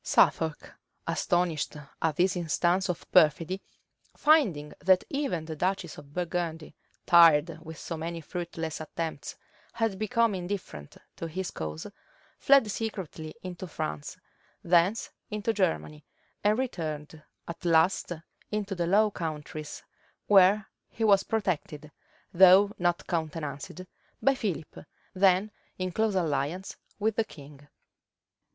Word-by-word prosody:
Suffolk, 160 -2 +2 0.3
astonished 175 -4 0 0.2
at 160 -2 +1
this 180 +4 +2
instance 175 +2 +1
of 175 - -3
perfidy, 170 +3 +3 0.6
finding 215 - +3
that 185 0 +4
even 275 - -2
the 160 -1 -6
duchess 180 0 -2
of 145 -1 -15
Burgundy, 165 -2 -3 0.3
tired 165 -1 +6
with 160 -1 -9
so 165 - -5
many 165 +1 -4
fruitless 165 -1 -5
attempts, 160 +1 -5 0.4
had 225 -4 -1
become 230 0 +2
indifferent 175 - -6 0.2
to 165 - -4
his 180 +3 -4
cause, 80 0 -5 0.5
fled 270 -6 +5
secretly 190 -8 -5
into 185 0 -6
France, 75 - -5 0.5
thence 175 +5 +2 0.2
into 210 +1 -1
Germany, 75 - -1 0.4
and 210 +1 +3
returned 160 - -4 0.3
at 170 - -8
last 170 +2 +3 0.4
into 210 -1 -2
the 175 -2 -1
Low 210 +3 +4
Countries; 155 -2 -6 0.4
where 200 +1 +5 0.2
he 225 - -4
was 200 -3 +5
protected, 155 -8 -3 0.4
though 190 +3 +7
not 175 -1 0
countenanced, 155 -1 -4 0.4
by 275 - +4
Philip, 180 - -4 0.3
then 190 +2 +3 0.3
in 185 0 -2
close 220 +2 0
alliance 165 +2 -1 0.2
with 215 0 0
the 225 - +3
king. 145 -6 -14
175 Hz, 120 wpm, -28 LUFS, 155-195 Hz, 0.6 s, though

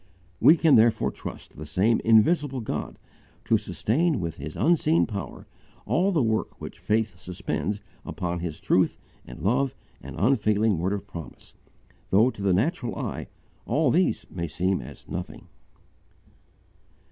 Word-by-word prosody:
We 165 - +7
can 160 -6 +5
therefore 110 0 +3
trust - - -9
the 75 - -7
same 105 +9 +2
invisible 135 +5 +3
God 110 - -4 0.5
to - - +3
sustain 155 +4 0
with 85 -2 -4
His 75 +2 -7
unseen 165 -1 +3
power 100 -3 -6 0.4
all 190 +4 +2
the 160 -8 +2
work 110 -1 -1
which - - -9
faith 105 -5 -1
suspends 90 +2 -3 0.2
upon 85 -1 -3
His 85 -3 -5
truth - - +2 0.3
and - - -10
love 130 +7 +1 0.3
and - - -9
unfailing 105 -3 +2
word 95 +4 0
of 100 - -4
promise, 85 -3 -10 0.6
though 110 +6 +4
to 100 - -11
the 100 -1 +2
natural 120 - 0
eye - - -4 0.4
all 150 -3 +2
these 165 -11 +1
may 85 -2 -3
seem 90 +2 0
as 65 +3 -12
nothing. 90 +1 -7
105 Hz, 145 wpm, -26 LUFS, 90-135 Hz, 0.6 s, We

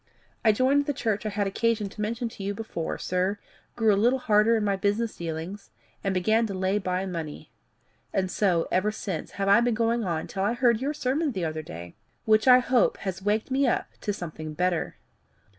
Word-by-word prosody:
I 220 - +6
joined 265 +6 +2
the 290 - +1
church 215 -2 -1
I - - 0
had 205 0 -1
occasion 215 +1 0
to 210 - -8
mention 230 +3 -2
to 215 - -11
you 200 +1 -2
before, 195 -7 -4
sir, 185 +3 -1 0.4
grew 220 -3 +3
a - - +3
little 250 +3 +4
harder 220 -1 +3
in 215 - -1
my 200 -1 +1
business 205 +3 0
dealings, 170 +4 -6 0.3
and 195 - 0
began 220 +5 +2
to 195 - -5
lay 190 +2 +1
by 185 0 -2
money. 165 -5 -6 0.6
And 185 -1 -1
so, 180 -5 +1
ever 195 +3 +2
since, 210 -2 -5
have 195 -1 -2
I 200 +4 +6
been 240 -1 +1
going 230 +1 +1
on 170 -4 -2
till 190 - -5
I 210 +4 +1
heard 240 -2 +2
your 290 +3 -1
sermon 285 +2 0
the 185 -4 -2
other 155 0 -3
day, 85 - -9 0.3
which 215 +2 +3
I 250 -1 +9
hope 250 -1 +2
has 190 -1 -3
waked 210 +5 0
me 270 +1 +2
up - - 0
to 205 - -1
something 155 -5 -6
better. 180 0 0
210 Hz, 210 wpm, -26 LUFS, 185-230 Hz, 0.6 s, I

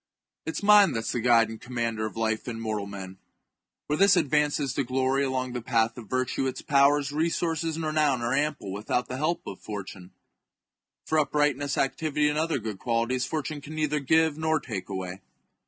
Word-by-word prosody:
It 160 - -2
is - - -4
mind 205 -6 +6
that 115 - 0
is - - -2
the 120 - -1
guide 115 -2 +4
and 110 -1 -8
commander 115 -3 -2
of 110 - -10
life 110 0 -1
in 115 -2 -4
mortal 110 -3 -3
men. 95 -1 -8 0.7
Where 150 - -1
this 195 -1 +5
advances 150 -3 +1
to 140 - 0
glory 130 +2 +1
along 130 -2 -2
the 125 - -3
path 115 -1 +1
of 115 -4 -10
virtue, 130 +1 0
its 130 0 -5
powers, 140 0 +3
resources, 165 +1 -1
and 165 0 -3
renown 150 -5 +1
are 120 +2 0
ample 145 -8 -1
without 110 +4 -2
the 130 - -4
help 155 +5 -1
of 100 - -7
fortune; 100 -3 -7 1.0
for 155 - +2
uprightness, 145 -1 +1
activity, 150 +2 +1
and 150 +1 -1
other 160 -1 0
good 110 -5 -5
qualities, 120 +2 0
fortune 155 -1 -3
can 155 +2 -9
neither 150 -1 0
give 160 +2 +2
nor 160 0 +1
take 95 -6 -6
away. 95 -1 -5
130 Hz, 190 wpm, -27 LUFS, 115-150 Hz, 1.0 s, mind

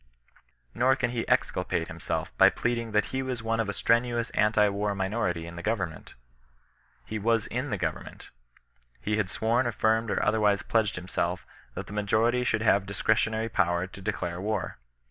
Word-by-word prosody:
Nor 130 +2 +3
can 120 -2 -1
he 120 -2 -3
exculpate - - 0
himself - - -4
by - - +7
pleading 115 -1 -2
that 105 0 +2
he 130 - 0
was 130 -3 -4
one 115 0 0
of 110 -3 0
a - - -1
strenuous 120 +2 +1
anti 105 0 +3
war 100 0 -1
miifwHiy 95 -4 -1
in 85 0 -9
the - - -5
government. 90 -7 -3 0.9
He 110 - -4
was 115 +1 +2
in - - -3
the - - -1
government. - - -5 0.7
He 105 0 -1
had 105 -3 0
sworn, 115 +5 +1
affirmed, 110 0 +1
or - - 0
other 110 +2 +2
wise 105 -2 +2
pledged 110 -3 +1
himself, 90 0 -2 0.3
that - - -5
the - - -10
majority 110 +4 +2
should 115 -2 0
have 100 -3 +3
dis 100 - -6
cretionary 110 +1 +1
power 85 -1 +2
to 95 +1 -11
declare 90 -3 -3
war. 105 - -2
110 Hz, 180 wpm, -28 LUFS, 100-115 Hz, 0.9 s, by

